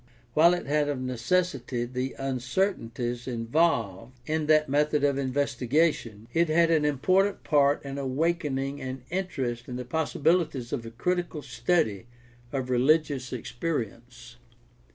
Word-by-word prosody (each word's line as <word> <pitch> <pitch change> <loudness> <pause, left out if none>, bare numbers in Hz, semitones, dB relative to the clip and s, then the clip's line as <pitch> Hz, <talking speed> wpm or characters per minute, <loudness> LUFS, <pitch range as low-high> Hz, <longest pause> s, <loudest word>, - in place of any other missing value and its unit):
While 170 +5 +6
it 175 - -5
had 145 +1 +1
of 140 -3 -2
necessity 130 0 -1
the 130 +2 -4
uncertainties 130 - -2
involved 115 - 0
in 155 +1 -1
that 155 0 +4
method 150 +1 +1
of 140 -1 +2
investigation, 130 -3 0
it 170 0 +2
had 165 +1 +4
an 155 -2 +3
important 185 +8 +2
part 145 -1 +3
in 140 0 -5
awaken 145 +2 0
ing 135 +1 -3
an 130 -1 -5
interest 135 -11 -3
in 125 - -5
the 125 0 -5
possibilities 155 -1 0
of 115 -5 -3
a - - -5
critical 170 +5 -2
study 120 - 0 0.4
of 130 -2 -3
religious 135 0 +2
experience. 120 -2 -5
135 Hz, 130 wpm, -27 LUFS, 125-155 Hz, 0.4 s, While